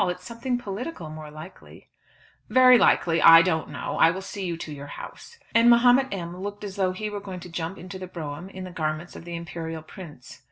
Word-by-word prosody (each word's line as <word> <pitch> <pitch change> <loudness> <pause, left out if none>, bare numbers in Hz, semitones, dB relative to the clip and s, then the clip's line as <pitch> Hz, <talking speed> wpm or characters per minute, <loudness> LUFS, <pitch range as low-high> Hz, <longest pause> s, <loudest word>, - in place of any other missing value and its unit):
It's 180 0 -4
something 240 +3 -3
political, 205 - -6
more 155 -1 -9
likely." 155 +5 -13 0.6
"Very 255 +1 +7
likely, 165 -1 +3
I 165 0 +9
don't 160 -4 -1
know, 140 -3 -5
I 165 - +7
will 190 +3 -4
see 200 0 -6
you 170 -1 -3
to 155 -2 -7
your 140 0 -9
house." 465 - -10 0.2
And 230 +1 +6
Mahomet 245 +3 +5
M. 175 -2 -5
looked 205 +1 -6
as 200 -2 -6
though 190 -2 +1
he 215 +4 -4
were 205 -1 -4
going 190 -2 -8
to 180 - -10
jump 170 +2 -4
into 185 +1 -9
the 185 - -7
brougham 165 0 -7
in 190 -1 -8
the 185 - -8
garments 155 0 -3
of - - -10
the 170 0 -6
imperial 165 -1 -6
prince. 155 -5 -12
180 Hz, 215 wpm, -25 LUFS, 165-205 Hz, 0.6 s, I